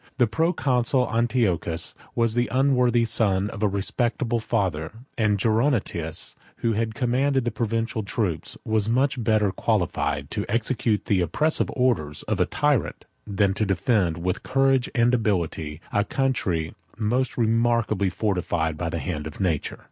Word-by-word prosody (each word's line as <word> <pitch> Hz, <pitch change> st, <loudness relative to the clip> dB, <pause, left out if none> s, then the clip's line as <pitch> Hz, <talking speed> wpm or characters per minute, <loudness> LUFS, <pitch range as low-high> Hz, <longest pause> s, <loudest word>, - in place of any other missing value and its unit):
The 125 Hz, -, +5 dB
proconsul 125 Hz, -1 st, +1 dB
Antiochus 110 Hz, -9 st, 0 dB, 0.2 s
was 115 Hz, -1 st, +2 dB
the 120 Hz, +1 st, +1 dB
unworthy 125 Hz, -3 st, +3 dB
son 105 Hz, -3 st, +1 dB
of -, -, -8 dB
a 105 Hz, -, +3 dB
respectable 115 Hz, +4 st, -1 dB
father; 95 Hz, -9 st, -1 dB, 0.2 s
and 105 Hz, -3 st, +2 dB
Gerontius, 110 Hz, -, 0 dB, 0.2 s
who 115 Hz, -1 st, 0 dB
commanded 130 Hz, +2 st, 0 dB
the 120 Hz, -, 0 dB
provincial 115 Hz, -1 st, -1 dB
troops, 100 Hz, -6 st, -3 dB
was 110 Hz, -1 st, 0 dB
much 130 Hz, +1 st, +1 dB
better 110 Hz, -3 st, +2 dB
qualified 75 Hz, -5 st, -1 dB
to 105 Hz, -, -1 dB
execute 115 Hz, -1 st, 0 dB
the 95 Hz, -3 st, +2 dB
oppressive 150 Hz, -, +1 dB
orders 85 Hz, -, 0 dB
of -, -, -2 dB
a -, -, +3 dB
tyrant, -, -, 0 dB, 0.2 s
than 100 Hz, -1 st, +1 dB
to 105 Hz, -, -1 dB
defend, 95 Hz, -3 st, +1 dB
with 90 Hz, +1 st, -2 dB
courage 135 Hz, -1 st, +2 dB
and 120 Hz, 0 st, +3 dB
ability, 85 Hz, -9 st, -1 dB
a 105 Hz, -, +3 dB
country 100 Hz, -11 st, -1 dB, 0.2 s
most 120 Hz, +4 st, 0 dB
remarkably 115 Hz, -3 st, +2 dB
fortified 90 Hz, -5 st, -1 dB
by 85 Hz, -, -1 dB
the 85 Hz, -, -3 dB
hand 80 Hz, -3 st, -4 dB
of 80 Hz, -, -10 dB
nature. 85 Hz, -7 st, -1 dB
110 Hz, 140 wpm, -24 LUFS, 90-120 Hz, 0.2 s, The